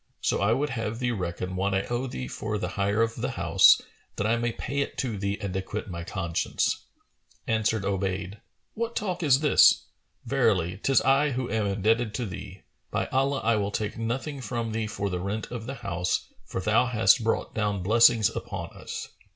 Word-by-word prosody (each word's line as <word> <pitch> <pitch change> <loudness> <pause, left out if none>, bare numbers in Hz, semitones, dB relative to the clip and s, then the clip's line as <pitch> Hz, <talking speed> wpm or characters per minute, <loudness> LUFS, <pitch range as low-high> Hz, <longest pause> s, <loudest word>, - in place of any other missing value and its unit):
So - - 0
I 100 +2 +3
would 135 +4 +1
have 115 -3 -3
thee 120 0 0
reckon 90 -3 -3
what 95 +1 0
I 95 - +1
owe 120 +2 -2
thee 65 - -5
for 105 +10 -3
the 105 - -3
hire 100 +3 +1
of 115 0 -2
the - - -2
house, - - +5 0.4
that 105 - -2
I 115 +2 +3
may 120 0 0
pay 140 +4 -4
it 140 - -2
to 120 -5 -1
thee 100 0 -2
and 95 -2 -4
acquit 95 0 -4
my 85 -1 -5
conscience." 85 -1 -1 0.6
Answered 110 -2 +1
Obayd, 95 0 -2 0.3
"What 230 +1 -3
talk 185 -4 -2
is 140 -4 +4
this? 150 - +6 0.4
Verily, 90 -1 +1
'tis 135 - +3
I 135 +2 +3
who 125 -3 -3
am 110 -1 0
indebted 110 +3 +1
to 125 - -2
thee. 95 -1 -8 0.3
By - - -1
Allah, 135 +1 +1
I 115 -1 +3
will 100 -1 0
take 105 0 -3
nothing 130 +5 -3
from 120 -3 -3
thee 110 0 -2
for 100 -2 -3
the 90 -2 -2
rent 100 +5 -4
of 120 -2 -6
the 135 - -4
house, 90 -6 -2 0.2
for - - -4
thou 110 +6 +3
hast 115 0 +4
brought 115 - -1
down 105 -3 -1
blessings 115 +1 +5
upon - - -5
us! - - -6
110 Hz, 195 wpm, -27 LUFS, 100-120 Hz, 0.6 s, this